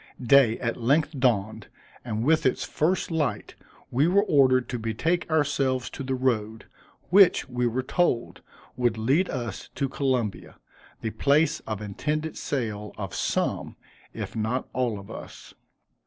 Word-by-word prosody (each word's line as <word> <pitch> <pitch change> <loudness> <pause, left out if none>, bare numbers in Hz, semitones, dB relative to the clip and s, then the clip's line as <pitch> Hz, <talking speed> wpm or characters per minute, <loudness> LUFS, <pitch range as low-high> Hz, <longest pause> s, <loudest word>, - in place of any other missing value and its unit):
Day 125 -2 +5
at 115 0 -3
length 145 +6 +2
dawned, 110 -5 0 0.4
and 110 -2 -3
with 160 +4 +3
its 130 - +1
first 175 +3 0
light 155 -5 -1 0.4
we 140 +6 +3
were 200 +3 +4
ordered 130 - +3
to 120 - -3
betake 150 +12 -1
ourselves 135 -5 0
to - - -7
the 130 0 -2
road, 110 -4 -1 0.5
which, 195 -1 +6
we 125 -1 -1
were 125 +3 -1
told, 130 -4 0 0.3
would 120 -3 +1
lead 135 +12 +2
us 120 -6 -5
to 140 - 0
Columbia, 130 -6 -2 0.5
the 110 - -2
place 140 +8 +2
of 110 -1 -4
intended 150 +10 -3
sale 105 -6 -3
of 100 -4 -5
some, - - -1 0.4
if - - -6
not 110 +4 -1
all 120 -4 0
of 100 0 -10
us. - - -10
130 Hz, 145 wpm, -26 LUFS, 110-145 Hz, 0.5 s, which